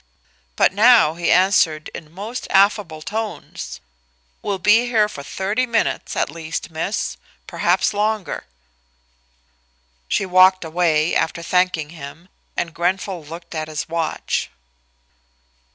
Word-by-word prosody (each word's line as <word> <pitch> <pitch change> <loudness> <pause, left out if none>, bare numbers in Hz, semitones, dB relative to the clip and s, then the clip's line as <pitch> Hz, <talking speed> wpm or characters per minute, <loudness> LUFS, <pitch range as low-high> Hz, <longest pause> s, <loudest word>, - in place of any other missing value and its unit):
But - - +3
now 220 -5 +6
he 170 0 -2
answered 180 -4 +3
in 155 -2 -9
most 210 +8 -6
affable 195 -5 +2
tones: 220 +2 -5 0.6
"We'll 200 -1 -2
be 210 +6 +4
here 220 -3 +3
for 180 -9 -8
thirty 205 - -2
minutes, 235 -1 -1
at - - 0
least, 165 +1 -5
Miss 165 +6 -2 0.3
perhaps - - +1
longer." 210 -4 -1 1.6
She 195 - 0
walked 185 0 +5
away, 160 -1 +1
after 170 +1 0
thanking 175 -3 +1
him, 165 +3 -10 0.3
and 170 -1 -2
Grenfall 180 +1 -1
looked 165 +4 -10
at 155 -1 -3
his 155 -1 -4
watch. 165 -1 -2
180 Hz, 120 wpm, -21 LUFS, 160-205 Hz, 1.6 s, now